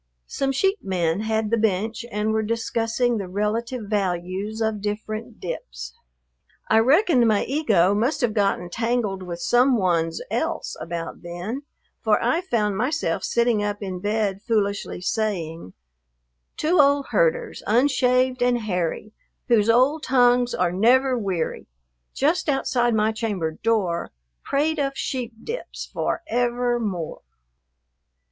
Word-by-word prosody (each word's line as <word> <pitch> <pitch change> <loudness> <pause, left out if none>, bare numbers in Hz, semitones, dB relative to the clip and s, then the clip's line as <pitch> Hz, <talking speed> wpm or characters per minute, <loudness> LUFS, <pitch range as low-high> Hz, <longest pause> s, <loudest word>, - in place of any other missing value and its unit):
Some 270 - -1
sheep 385 +9 +1
men 175 -2 0
had 220 0 -1
the 230 - +3
bench 220 +2 0
and 210 0 0
were 220 - +1
discussing 230 +1 0
the 195 - -4
relative 220 +5 -2
values 195 +1 -2
of 220 -2 -1
different 215 +2 -4
dips. 60 - -6 0.8
I 220 - +6
reckon 270 - +4
my 215 -2 +3
ego 220 - +2
must 235 +10 0
have 240 -4 +1
gotten 195 -4 0
tangled 225 -3 -1
with 175 -2 -6
some 245 +7 +3
one's 165 -4 +1
else 320 +9 -2
about 165 0 -5
then, 175 +9 -5 0.4
for - - +3
I 335 - +1
found 210 - 0
myself 290 +9 -1
sitting 235 -3 +2
up 205 0 -3
in 185 -2 -4
bed 205 -1 -1
foolishly 205 -5 -1
saying, 175 - -2 0.8
"Two 330 +3 +2
old 280 0 +2
herders, - - +1
unshaved 255 +1 +2
and 245 0 +3
hairy, 190 +1 -2 0.4
Whose 225 -2 +4
old 260 +7 +4
tongues 245 -2 +3
are 180 -1 +1
never 250 +7 +3
weary, 190 -8 -2 0.5
Just 315 +4 +1
outside 245 -4 +1
my 215 0 +2
chamber 210 -7 -2
door 185 -2 0 0.3
Prate 305 +2 0
of 275 -1 0
sheep 250 -4 -3
dips 475 +2 -6
for - - -1
ever 245 -3 0
more." 185 -8 -4
220 Hz, 135 wpm, -23 LUFS, 195-250 Hz, 0.8 s, I